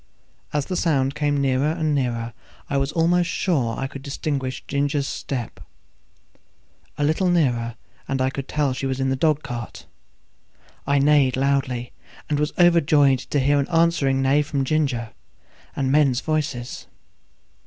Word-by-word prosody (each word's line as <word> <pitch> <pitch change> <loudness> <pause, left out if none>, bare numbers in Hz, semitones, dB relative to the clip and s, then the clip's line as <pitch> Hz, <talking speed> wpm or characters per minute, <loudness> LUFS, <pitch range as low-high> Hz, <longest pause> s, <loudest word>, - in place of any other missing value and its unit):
As 145 -2 -1
the 185 - -3
sound 140 -6 +1
came 145 -1 0
nearer 135 +1 +1
and 160 -2 -1
nearer 120 -4 -1 0.4
I 140 - +1
was 135 +1 0
almost 175 +2 +2
sure 140 - 0
I 135 - -2
could 135 0 -7
distinguish 135 -1 -3
Ginger's 140 0 0
step; 120 - -5 1.4
a 145 - -1
little 160 +5 +2
nearer 120 -9 +1
still, - - -36
and 135 - -1
I 130 0 +1
could 135 0 -5
tell 145 -3 0
she 135 +1 -3
was 130 0 -2
in 135 0 0
the - - +1
dog 155 +1 +1
cart. 120 -2 -7 1.0
I 140 0 +3
neighed 140 -2 +3
loudly, 130 -3 0 0.4
and 145 - +1
was 150 0 0
overjoyed 150 -6 +4
to 145 - -2
hear 145 +2 +3
an 140 - 0
answering 165 -6 +2
neigh 140 +2 +3
from 145 -2 -2
Ginger, 130 -6 0 0.6
and 135 -1 0
men's 140 -3 +3
voices. 140 -6 -3
140 Hz, 155 wpm, -23 LUFS, 130-150 Hz, 1.4 s, overjoyed